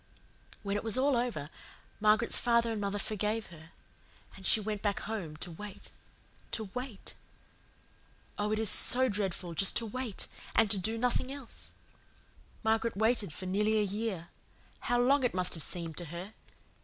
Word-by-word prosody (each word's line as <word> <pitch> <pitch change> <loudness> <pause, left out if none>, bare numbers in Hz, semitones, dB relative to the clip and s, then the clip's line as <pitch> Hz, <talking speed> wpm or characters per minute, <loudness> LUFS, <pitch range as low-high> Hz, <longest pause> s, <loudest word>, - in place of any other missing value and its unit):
"When 200 0 -1
it 205 - -4
was 225 +2 +1
all 275 +1 +3
over, 235 -11 -2 0.5
Margaret's 215 +2 +3
father 235 -1 +2
and 215 -2 -3
mother 200 0 -2
forgave 215 +1 -2
her, 160 0 -14 0.7
and 190 -1 -6
she - - +5
went 210 -1 -4
back 205 -2 -1
home 185 -9 -5
to 175 +2 -6
wait 205 +4 -10 0.6
to 215 -4 -3
WAIT. 250 -5 -5 1.2
Oh, 210 0 -1
it 215 - +1
is 220 -2 +3
so 255 +1 +8
dreadful 190 -4 -3
just 195 +4 +4
to 230 - 0
WAIT, 230 -1 -4 0.3
and 205 -3 +4
do 220 +4 0
nothing 250 +2 0
else. 275 -4 -9 0.9
Margaret 220 0 +1
waited 220 -4 +1
for 185 - -7
nearly 210 +4 +1
a 210 - +3
year. 200 -4 -3 0.5
How 245 0 0
long 265 +3 +3
it 245 - +1
must 180 -1 +3
have 165 - -3
seemed 165 +1 -3
to 175 - -2
her! 175 +6 -8
210 Hz, 165 wpm, -31 LUFS, 190-230 Hz, 1.2 s, so